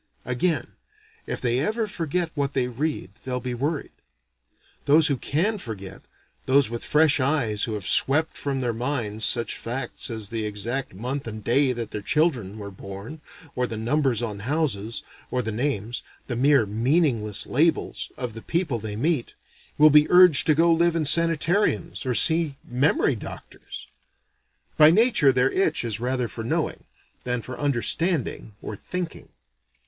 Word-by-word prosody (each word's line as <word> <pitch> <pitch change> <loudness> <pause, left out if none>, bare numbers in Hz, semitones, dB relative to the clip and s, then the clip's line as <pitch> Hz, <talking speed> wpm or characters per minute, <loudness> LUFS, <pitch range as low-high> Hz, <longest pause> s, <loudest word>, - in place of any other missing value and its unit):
Again, 125 +3 -1 0.6
if - - -3
they 120 0 +1
ever 220 - -1
forget 170 -3 -3
what 140 -2 -2
they 130 -2 0
read, 130 -4 -3
they'll 125 -1 -3
be 125 0 -4
worried. 145 +5 -3 0.9
Those 155 +2 +5
who 140 - +2
can 180 - -1
forget 100 - -8 0.5
those 135 -3 +3
with 120 - -5
fresh 150 -1 +3
eyes 130 -6 +1
who 110 - -4
have 100 -3 -5
swept 155 +4 +2
from 135 -2 -3
their 120 -2 -1
minds 115 -3 -2
such 120 +1 +1
facts 125 +4 -3
as 110 -3 -2
the 115 -1 -3
exact 105 +3 -3
month 125 +6 -4
and 110 -1 -7
day 130 +4 +2
that 115 -2 -5
their 105 - -4
children 120 - 0
were 100 -1 -8
born, 100 +10 -9 0.3
or 125 0 0
the 110 - -5
numbers 125 0 0
on 105 -3 -4
houses, 115 -4 -2 0.3
or 125 0 -1
the 110 - -3
names 115 -1 -2 0.2
(the 120 - -4
mere 135 -1 +3
meaningless 115 - 0
labels) 155 +4 0
of 125 -3 -4
the 115 - -8
people 165 -7 -2
they 105 -1 -5
meet, 145 +2 -1 0.4
will 155 0 +7
be 150 +1 +5
urged 180 -5 +8
to 155 - +4
go 165 +2 +4
live 170 +1 +2
in 160 -2 0
sanitariums 165 - +1
or 125 - 0
see 160 -2 +3
memory 135 +1 +1
doctors! 105 - -10 0.9
By 150 0 +8
nature 200 - +4
their 130 +1 +2
itch 165 -9 0
is 110 -2 -3
rather 125 0 -1
for 115 - -7
knowing, 115 - -2 0.4
than 125 -2 -2
for 130 - -7
understanding 145 - 0
or 105 - -5
thinking. 180 - -6
130 Hz, 160 wpm, -24 LUFS, 115-155 Hz, 0.9 s, urged